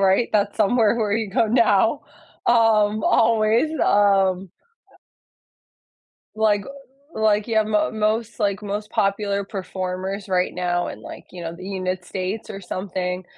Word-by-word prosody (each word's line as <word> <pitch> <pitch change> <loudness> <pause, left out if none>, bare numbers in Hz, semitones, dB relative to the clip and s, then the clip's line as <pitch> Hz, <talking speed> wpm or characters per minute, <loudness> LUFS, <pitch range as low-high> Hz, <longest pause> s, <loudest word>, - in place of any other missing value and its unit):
right? 195 +4 +3
That's 205 -1 +1
somewhere 220 +1 +3
where 215 -3 0
you 220 -3 -2
go 215 +3 +1
now, 225 +2 +3 0.4
um, 220 -3 +3
always, 225 +5 +3
um 195 -2 +2 1.9
Like 215 -2 +2 0.5
like, 215 0 +1
yeah, 220 -2 +2
mo 210 -1 0
most, 220 +1 -1
like, 200 0 0
most 210 +1 -4
popular 200 -1 0
performers 190 0 -5
right 185 -1 0
now 175 -1 -1
in, - - -9
like, - - -10
you 180 - -9
know, 165 0 -6
the 185 - -11
unit 185 -2 -3
states 190 +4 -5
or 195 - -6
something. 185 -1 -4
205 Hz, 135 wpm, -22 LUFS, 190-220 Hz, 1.9 s, right